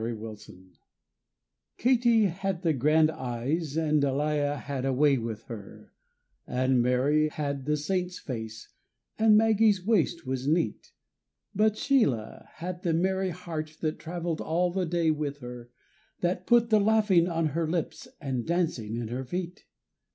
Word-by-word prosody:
_ - - -3
SHEILA 110 -5 -8 1.1
Katie 235 -3 +4
had 190 0 -2
the 165 -2 +2
grand 155 +4 +3
eyes 140 +3 -3
and 155 -2 +2
Delia 145 +1 0
had 135 -1 -4
a 135 - +1
way 140 0 +3
with 115 -1 -5
her, 105 -4 -10 0.5
And 130 0 +2
Mary 135 +5 +2
had 140 -3 -4
the 150 0 +2
Saints' 180 +3 -2
face 110 -4 -7 0.5
and 220 -1 +6
Maggie's 215 -3 +3
waist 175 -7 +1
was 130 +1 -3
neat, 165 +3 0 0.6
But 215 +1 +2
Sheila 145 - 0
had 175 +2 -6
the 165 -3 0
merry 190 +2 +1
heart 160 -3 -6
that 155 -1 -2
travelled 170 -1 -4
all 175 +2 0
the 185 -1 -1
day 165 -1 +2
with 150 -2 -3
her, 120 -1 -9 0.5
That 180 +1 -1
put 235 -1 +4
the 215 - +6
laughing 210 -5 +3
on 165 -2 0
her 160 +2 -1
lips 165 0 -3
and 130 -5 -3
dancing 160 -11 -1
in 115 -2 -4
her 125 +3 -3
feet. 175 +6 -5
155 Hz, 150 wpm, -28 LUFS, 130-180 Hz, 1.1 s, and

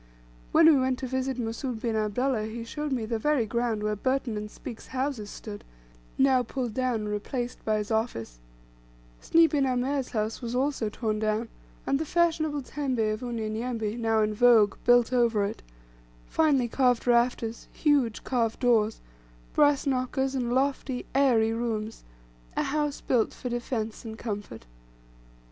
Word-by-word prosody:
When 325 +1 +6
we 305 -4 +7
went 260 0 +1
to 260 - -4
visit 260 0 -2
Mussoud 235 +1 -3
bin 230 -2 -1
Abdullah, 220 +2 0
he 230 +1 -6
showed 295 +5 -4
me 245 -4 -1
the 225 0 -2
very 295 -2 +2
ground 235 -1 -1
where 210 0 0
Burton 260 +1 -1
and 210 0 -4
Speke's 220 +1 -9
house 265 -1 -2
stood 205 -1 -8 0.5
now 265 -1 +4
pulled 245 -1 -4
down 255 -2 0
and 210 - -4
replaced 240 +4 -4
by 215 -1 +1
his 210 +1 -4
office 165 - -2 0.8
Sny 330 0 +5
bin 285 -4 +1
Amer's 260 +1 0
house 220 0 -2
was 240 0 -4
also 260 -4 0
torn 215 -1 -2
down, 215 +1 -1 0.4
and 275 +1 +1
the 320 - -2
fashionable 315 -4 +1
tembe 250 -6 -1
of 215 - -6
Unyanyembe, 225 -1 -3
now 225 -2 +1
in 215 0 0
vogue, 220 -2 +5
built 245 0 +5
over 230 -4 +3
it, 200 - -5 0.6
finely 285 -6 +2
carved 250 0 +2
rafters 235 -1 +1
huge 280 -8 +1
carved 230 -3 0
doors, 225 -3 +2 0.5
brass 290 -2 +4
knockers, 265 0 0
and 245 -3 -1
lofty 265 -1 0
airy 240 -5 +3
rooms 225 -2 -3 0.5
a - - +2
house 295 -1 -1
built 240 -4 +1
for 250 - -5
defence 235 -2 -3
and 220 -1 -7
comfort. 205 - -6
240 Hz, 160 wpm, -27 LUFS, 220-265 Hz, 0.8 s, we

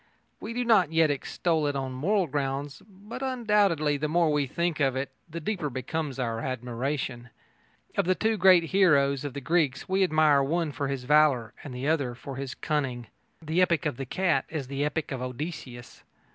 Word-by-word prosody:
We 225 - -6
do 245 0 -1
not 195 -9 +4
yet 160 -2 +3
extol 155 +2 -1
it 145 - -1
on 135 -1 -3
moral 185 +10 +1
grounds, 140 0 -3
but 205 +5 -10
undoubtedly, 210 - +2
the 150 +2 -1
more 165 0 +2
we 145 -2 +1
think 170 +3 -1
of 135 -2 +2
it, 135 +1 -3 0.2
the 165 +1 -5
deeper 165 -3 -2
becomes 135 +3 -4
our 115 -3 -2
admiration. 125 0 -3 0.7
Of 200 - +1
the 185 +1 +2
two 220 +3 +1
great 185 -3 +6
heroes 145 -7 +3
of 145 -2 -5
the 140 - -4
Greeks 160 -3 0
we 190 +1 +2
admire 155 -5 +4
one 160 +3 0
for 140 0 -3
his 135 -2 -3
valour 140 -5 +3
and 130 -3 -7
one 135 -1 0
for 135 +2 -8
his 135 -1 -5
cunning. 130 -7 -2 0.3
The 160 +3 +1
epic 170 -5 +2
of 145 -5 -1
the 135 - -5
cat 165 -4 +1
is 155 -4 -4
the 140 +2 -3
epic 150 +1 -2
of 130 -2 -4
Odysseus. 125 -2 -7
150 Hz, 185 wpm, -27 LUFS, 135-170 Hz, 0.7 s, great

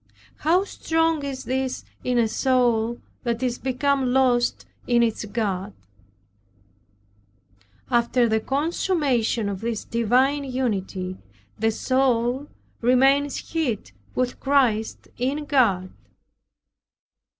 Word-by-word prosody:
How 350 +5 +3
strong 325 -5 0
is 270 -2 -4
this 260 0 -2 0.2
in 250 -1 0
a 235 -2 +3
soul 240 -1 +1 0.2
that 235 0 -2
is 245 -1 -1
become 265 0 0
lost 250 -2 +2 0.2
in 240 -1 +4
its 225 -2 -1
God! 205 -2 -2 2.2
After 240 0 +3
the 220 0 +2
consummation 275 - 0
of 195 -2 -4
this 230 -2 -2
divine 255 +5 +2
unity, 195 -8 -2 0.4
the 225 +1 +2
soul 255 +2 +1 0.3
remains 270 +4 +2
hid 245 - -1 0.2
with 250 -1 -1
Christ 255 -6 +1
in 280 +4 -1
God. 205 -11 +2
250 Hz, 100 wpm, -24 LUFS, 225-270 Hz, 2.2 s, in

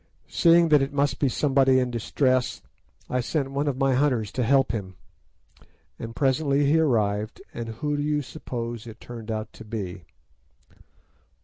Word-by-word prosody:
Seeing 170 -1 +5
that 150 -2 +6
it 135 - -1
must 140 0 +1
be 140 - +2
somebody 135 -1 +3
in 125 -1 +1
distress, 130 +2 0 0.4
I 125 - 0
sent 135 +2 -2
one 140 +2 -1
of 135 -3 -1
my 135 -1 +2
hunters 125 -6 +1
to 130 - -2
help 135 +3 +3
him, 95 -5 -5 1.0
and 115 0 -7
presently 140 0 +2
he 150 +3 +4
arrived, 110 -7 0
and 115 -1 -5
who 145 +7 -2
do - - -1
you 150 0 0
suppose 120 -5 -6
it 115 0 -10
turned 115 -2 -9
out 110 -1 -4
to - - -11
be?" 95 -6 -6
130 Hz, 165 wpm, -25 LUFS, 115-145 Hz, 1.0 s, that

